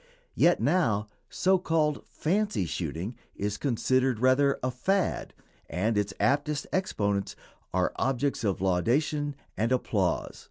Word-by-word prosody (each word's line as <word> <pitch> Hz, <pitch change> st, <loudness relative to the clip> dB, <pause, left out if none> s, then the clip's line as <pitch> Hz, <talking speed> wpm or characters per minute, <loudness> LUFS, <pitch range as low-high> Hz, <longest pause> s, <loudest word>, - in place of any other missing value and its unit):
Yet 175 Hz, +1 st, +4 dB
now 115 Hz, -, +1 dB, 0.2 s
so 190 Hz, 0 st, +2 dB
called 155 Hz, -4 st, 0 dB
"fancy 200 Hz, -, 0 dB
shooting" 85 Hz, -, -4 dB, 0.2 s
is 100 Hz, 0 st, -2 dB
considered 130 Hz, 0 st, +1 dB
rather 130 Hz, +3 st, +4 dB
a 130 Hz, -, 0 dB
"fad," 190 Hz, +10 st, -1 dB, 0.3 s
and 110 Hz, +6 st, 0 dB
its 105 Hz, -1 st, 0 dB
aptest 145 Hz, +1 st, +1 dB
exponents 100 Hz, -, -1 dB, 0.4 s
are 90 Hz, 0 st, +1 dB
objects 135 Hz, -1 st, 0 dB
of 100 Hz, -4 st, 0 dB
laudation 140 Hz, -, +1 dB, 0.2 s
and 115 Hz, +3 st, 0 dB
applause. 100 Hz, -8 st, 0 dB
130 Hz, 120 wpm, -28 LUFS, 100-150 Hz, 0.4 s, Yet